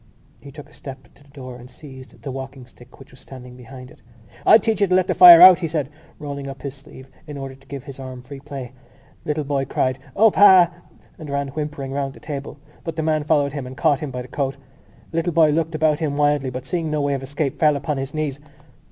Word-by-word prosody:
He 140 - -13
took 150 +1 -12
a - - -22
step 130 -4 -11
to - - -24
the 140 - -24
door 130 -3 -10
and 125 0 -14
seized 130 -2 -14
the 140 - -5
walking 135 0 -8
stick 120 -1 -19
which 135 - -16
was 130 - -16
standing 125 -2 -12
behind 125 +1 -12
it. - - -19 0.5
"I'll - - +9
teach 225 -3 -2
you 200 - +4
to 185 - +2
let 185 -1 +3
the - - -1
fire 175 -1 +10
out!" 185 -1 +9
he 170 - -2
said, 150 -4 -3 0.3
rolling 140 -1 -7
up 135 0 -9
his 140 -2 -5
sleeve 135 -1 -15 0.2
in 145 -1 -8
order 135 -1 -7
to 135 +1 -21
give 140 -2 -8
his 140 -1 -11
arm 130 -1 -9
free 135 +2 -10
play. 135 -3 -8 0.5
The - - -13
little 150 0 -1
boy 140 -1 -2
cried 130 0 -1 0.2
"O, 220 +1 +5
pa!" 185 -4 +6 0.5
and 155 -3 -9
ran 140 0 -2
whimpering 150 -2 -5
round 135 -1 -3
the - - -14
table, 140 -1 -7 0.3
but 165 - -5
the 160 - -2
man 155 -1 0
followed 145 -2 +1
him 140 -4 -5
and 130 +1 -10
caught 150 -4 +2
him 150 - -5
by 125 -1 -6
the - - -12
coat. 135 +1 -3 0.5
The 165 - -5
little 170 +1 -1
boy 155 -2 +4
looked 160 +1 -1
about 155 -1 +1
him 150 -3 -2
wildly 145 -2 +1
but, 130 0 -7
seeing 170 -3 -3
no 150 -1 -1
way 140 0 0
of 135 - -3
escape, 140 +1 -4
fell 150 -2 +4
upon 140 +1 -3
his 135 0 -5
knees. 150 -3 -3
140 Hz, 250 wpm, -21 LUFS, 135-155 Hz, 0.5 s, fire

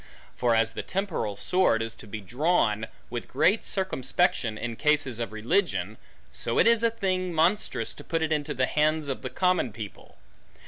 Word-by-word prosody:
For 120 -2 +2
as 115 0 +2
the - - -4
temporal 180 - -3
sword 115 - +2
is 115 0 -3
to 110 - -11
be 105 +1 -6
drawn 110 - +1 0.2
with 120 -1 -4
great 205 +5 +2
circumspection 160 - 0
in 115 +1 -4
cases 145 -4 +1
of 115 - -3
religion; 115 - 0 0.3
so - - -2
it - - +6
is 230 -1 +5
a 230 - +4
thing 185 -5 -1
monstrous 165 - +1
to - - -11
put 165 -1 -1
it 160 - -1
into 150 -1 -1
the 130 0 +2
hands 155 +1 +1
of 135 - -3
the 130 - -4
common 180 -3 +1
people. 105 -1 -10
145 Hz, 180 wpm, -27 LUFS, 115-180 Hz, 0.3 s, it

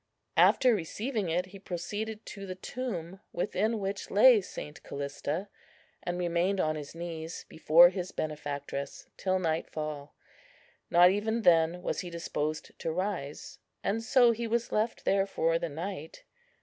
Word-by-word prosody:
After 255 -2 +6
receiving 210 +2 -2
it, 175 +3 +1
he 190 +1 -12
proceeded 205 +5 -5
to 195 -1 -8
the 185 - -5
tomb, 190 -4 -5
within 215 +6 0
which 195 -1 -4
lay 220 +2 +7
St. 150 -5 -8
Callista, 145 +6 -4 0.5
and 175 0 -3
remained 180 +2 +1
on 155 -3 +1
his 150 0 -7
knees 165 -1 -6
before 165 +2 +7
his 185 -1 -4
benefactress 145 -2 -4
till 185 -1 0
nightfall. 155 -4 -3 0.7
Not 175 +1 +7
even 220 +3 -1
then 170 0 +4
was - - -1
he 180 - -4
disposed 155 -2 -3
to 165 - -2
rise; 180 -5 -4 0.2
and 220 +3 0
so 240 +1 +5
he 230 +1 -2
was 235 +1 -1
left 220 +2 -1
there 195 0 +3
for 165 -3 +1
the 170 - -3
night. 160 +1 -6
180 Hz, 145 wpm, -30 LUFS, 160-205 Hz, 0.7 s, lay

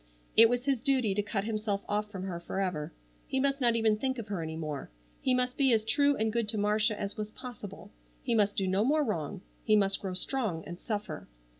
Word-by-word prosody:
It 225 0 +9
was 245 +1 0
his 275 -3 +2
duty 255 -5 +2
to 205 - +1
cut 205 -1 -2
himself 210 -2 -2
off 210 0 -1
from 190 -2 -6
her 180 -3 -4
forever. 175 -4 -3 0.4
He 265 - 0
must 275 +1 +1
not 235 -2 +4
even 220 -2 +3
think 260 +3 -1
of 225 -3 -6
her 195 -4 -2
any 160 0 -4
more. 155 -4 -5 0.3
He 255 - +2
must 250 0 +1
be 270 -2 +4
as 220 -1 +2
true 285 +3 +3
and 220 -2 0
good 230 -2 0
to 215 - -1
Marcia 210 +1 +1
as 200 +2 -4
was 210 0 -3
possible. 215 -4 -9 0.3
He - - +1
must 205 -2 +3
do 195 - 0
no 190 +3 +2
more 300 +5 +3
wrong. 180 - -3 0.2
He 215 - +4
must 195 -2 +2
grow 190 -2 -4
strong 200 - -1
and 175 +3 -8
suffer. 210 -2 -4
215 Hz, 230 wpm, -30 LUFS, 195-245 Hz, 0.4 s, It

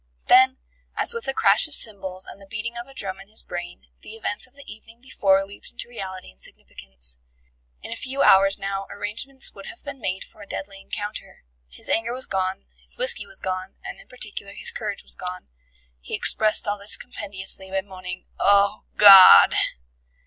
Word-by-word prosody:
Then, 260 +1 +6 0.4
as - - +2
with 465 0 -6
a 270 - +1
crash 200 +9 +4
of 305 - -1
cymbals 190 -4 -1
and 200 - -12
the 195 - -15
beating 225 +4 -5
of 240 +1 -7
a 270 - -15
drum 190 -4 -6
in 195 - -13
his 220 +2 -8
brain, 175 0 -7 0.2
the 220 - -11
events 215 +1 -3
of 255 - -30
the 280 - -14
evening 225 +2 -13
before 195 -6 +1
leaped 200 +1 -13
into 240 - -8
reality 190 -6 -8
and 60 - -15
significance. - - -7 0.6
In - - -8
a - - -2
few 265 +3 -2
hours 195 +1 +6
now 195 0 -4
arrangements 230 +7 -5
would 195 -1 -11
have - - -11
been 280 -3 -8
made 185 -2 -2
for 215 - -18
a 200 - -11
deadly 195 0 -7
encounter. 210 +1 -7 0.3
His - - -12
anger 225 +1 0
was 260 +1 -7
gone, 190 0 -2
his - - -12
whisky - - +1
was - - -11
gone, 185 0 -5
and - - -7
in - - -16
particular 205 -5 -5
his - - -2
courage 210 -3 -5
was - - -4
gone. 180 - -6 0.5
He - - -5
expressed 215 -1 +2
all 205 0 -1
this 200 +1 -2
compendiously 195 -4 -6
by 190 0 -1
moaning 185 -2 -8
"Oh, 200 +1 +3
God!" 195 -2 +10
200 Hz, 190 wpm, -23 LUFS, 190-230 Hz, 0.6 s, God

